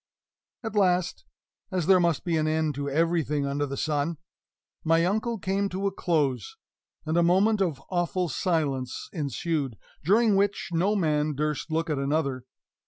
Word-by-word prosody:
At 225 - -4
last 185 -3 +1 0.5
(as 180 -4 -1
there 190 +1 +6
must 170 -4 +1
be 170 -2 0
an 155 -1 +1
end 155 -1 +1
to 140 +1 -3
everything 155 -1 +1
under 145 +1 -1
the 140 0 -5
sun) 155 +2 -1 0.7
my 165 +1 +3
uncle 220 +5 0
came 195 +1 -1
to 190 +2 -3
a 200 - +1
close; 145 - -1 0.5
and 160 +2 0
a - - +5
moment 195 +5 +3
of 165 -8 0
awful 180 0 0
silence 145 -6 -1
ensued, 145 - -2 0.3
during 210 +5 +4
which 200 +1 0
no 185 +5 +1
man 150 -5 +1
durst 150 +2 -2
look 165 +1 0
at 150 -4 -1
another. 140 -3 -1
165 Hz, 160 wpm, -27 LUFS, 145-185 Hz, 0.7 s, there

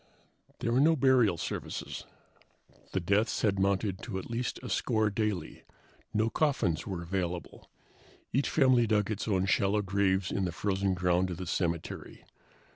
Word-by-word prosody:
There 115 - 0
were 120 - +3
no 160 +4 +5
burial 125 - +4
services. - - -5 0.9
The - - 0
deaths 100 +6 +1
had 100 -3 +2
mounted 100 0 0
to 105 -6 -5
at 95 - -6
least 120 +1 -2
a 125 - -5
score 110 +1 +1
daily. 100 -6 -2 0.5
No 110 +1 +1
coffins 115 - 0
were 90 -3 -4
available. 90 -1 -4 0.6
Each 135 +3 +1
family 130 -5 +4
dug 105 -1 +1
its 105 - -3
own 95 -3 +1
shallow 100 +2 +2
graves 95 -1 +1
in 95 - 0
the 90 - -2
frozen 95 +1 0
ground 90 +1 +1
of 90 - -4
the 90 - -5
cemetery. 85 -1 -3
100 Hz, 155 wpm, -30 LUFS, 95-110 Hz, 0.9 s, no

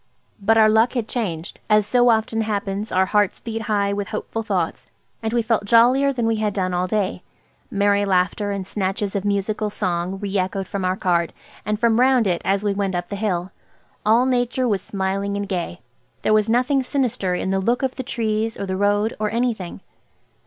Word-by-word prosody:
But 225 +3 +3
our 220 -1 +7
luck 220 +3 +3
had 240 -4 -2
changed. 185 -8 -4
As 210 -1 +4
so 245 +2 +4
often 225 0 +1
happens, 205 -1 -2
our 185 +1 +3
hearts 205 0 +1
beat 225 -1 -5
high 205 -2 0
with 200 -1 -3
hopeful 225 +2 -4
thoughts, 190 -7 -2 0.3
and 220 -1 -2
we 235 0 +1
felt 220 -2 0
jollier 250 +6 +5
than 240 -4 -1
we 225 -1 +1
had 215 -2 -1
done 185 -2 -1
all 180 +1 0
day. 190 -2 -1 0.5
Merry 200 0 +2
laughter 195 +2 +1
and 200 -2 -3
snatches 195 +1 -2
of 200 - -1
musical 205 +1 -1
song 180 -1 -2
re 200 -1 -4
echoed 190 +1 -2
from 200 -2 -4
our 185 +1 0
cart, 170 -3 +1 0.3
and 210 0 0
from 230 0 +3
round 255 -2 +4
it 175 -3 0
as 195 +1 +1
we 205 -1 +1
went 195 -2 -1
up 175 0 -3
the 200 - -3
hill. 190 -3 -2 0.5
All 230 +4 +4
Nature 250 0 +1
was 200 -5 0
smiling 195 +1 -2
and 200 0 -3
gay. 175 -2 -4 0.4
There - - +3
was 215 0 +3
nothing 255 +4 +2
sinister 250 -8 -1
in 190 - -2
the 195 - +1
look 240 +7 0
of 260 -1 -1
the - - -3
trees 225 -2 -1
or 200 - -2
the 190 -1 -3
road–or 205 +2 +1
anything. 230 -6 -2
205 Hz, 200 wpm, -22 LUFS, 195-225 Hz, 0.5 s, our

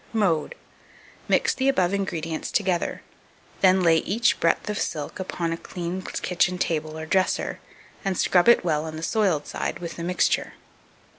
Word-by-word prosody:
Mode. 180 -9 +1 0.7
Mix - - +3
the 270 0 +1
above 185 -8 +2
ingredients 165 -5 -3
together; 185 -4 0 0.6
then 185 -1 +4
lay 165 -1 +5
each 230 +9 +1
breadth 165 +3 +1
of 210 0 -2
silk 150 +5 -4
upon 170 -3 -2
a - - -4
clean 175 +1 -5
kitchen 180 0 -1
table 155 -3 -2
or 160 - -5
dresser, 185 +3 0 0.4
and 195 -3 -1
scrub 180 +4 +4
it 235 - +5
well 155 -2 +1
on 160 -1 -6
the 160 - -6
soiled 190 -8 +1
side - - -3
with 170 -1 -7
the 170 - -5
mixture. 180 +1 +1
180 Hz, 160 wpm, -25 LUFS, 165-190 Hz, 0.7 s, lay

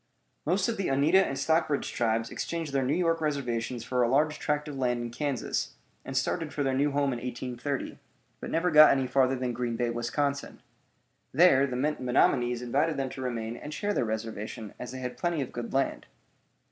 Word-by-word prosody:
Most 185 +5 +2
of 230 - -1
the 195 - -1
Oneida 150 +8 +4
and 135 - -3
Stockbridge 150 +1 +1
tribes 115 -1 0
exchanged 165 -4 -4
their 135 - +2
New 130 +4 +1
York 165 -2 +1
reservations 125 -5 -2
for 125 +1 0
a 120 - +3
large 150 +3 +2
tract 150 0 -1
of 145 - -6
land 125 -2 0
in 120 0 -4
Kansas, 140 0 -2 0.3
and 135 - -4
started 155 +4 -1
for 145 - -2
their 135 -1 +1
new 140 +3 +2
home 140 -1 +1
in 120 - -4
1830, 125 +2 -4 0.4
but - - -6
never 175 +2 +1
got 155 0 +9
any 135 -1 +2
farther 130 0 +2
than 125 -1 -2
Green 120 -1 -2
Bay, 120 0 0
Wisconsin. 140 +4 -2 0.7
There 140 -3 +5
the 125 - -4
Menominees 125 -3 +1
invited 145 +6 +1
them 135 -1 -1
to 130 - -7
remain 115 -3 -3
and 150 - -8
share 205 0 -1
their - - +1
reservation, 110 -1 -5
as 125 - -6
they 130 - -6
had 125 -1 -5
plenty 175 -2 0
of 135 - -3
good 120 -1 -5
land. 135 +1 -1
135 Hz, 195 wpm, -28 LUFS, 120-150 Hz, 0.7 s, got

